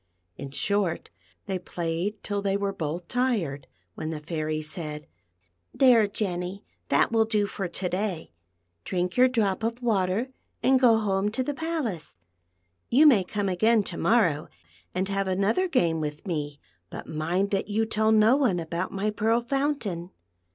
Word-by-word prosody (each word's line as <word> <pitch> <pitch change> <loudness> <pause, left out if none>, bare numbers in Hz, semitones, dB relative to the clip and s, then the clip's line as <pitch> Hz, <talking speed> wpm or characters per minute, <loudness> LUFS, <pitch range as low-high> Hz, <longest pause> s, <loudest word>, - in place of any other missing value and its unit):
In 140 0 -7
short, 195 +4 -1 0.3
they 190 -2 -2
played 175 +3 -3
till 205 -1 -2
they 200 0 0
were 200 0 -2
both 170 0 -4
tired, 210 - -1 0.3
when 155 - -5
the 160 -1 -4
Fairy 155 0 -3
said, 155 -1 -6 0.4
" 85 0 -46
There, 240 -5 +5
Jenny; 190 -1 -4 0.2
that - - +3
will 225 -1 +3
do 215 -2 +1
for 195 -2 -4
to 180 +1 -3
da}'. 180 - -3 0.5
Drink 180 0 -2
your 255 +1 +6
drop 220 -5 0
of 230 +2 -2
water, 215 0 0 0.3
and 260 0 +5
go 240 -3 +5
home 200 -2 0
to 230 +5 -1
the 290 - -2
palace. 275 - -3 0.7
You 285 +6 +5
may 240 -11 +6
come 205 +2 -2
again 215 +4 +3
to - - -5
morrow 170 -11 +2 0.5
and 185 +1 0
have 195 -1 -1
another 200 - +1
game 170 - +1
with 150 0 -5
me, 150 -5 -3 0.3
but - - -8
mind 175 +6 -1
that 195 -1 0
you 215 +2 0
tell 220 0 +1
no 220 +3 +5
one 245 -11 +2
about 170 +2 -3
my 200 +2 -1
Pearl 220 +2 +1
Fountain." 240 - -2
195 Hz, 165 wpm, -26 LUFS, 170-225 Hz, 0.7 s, your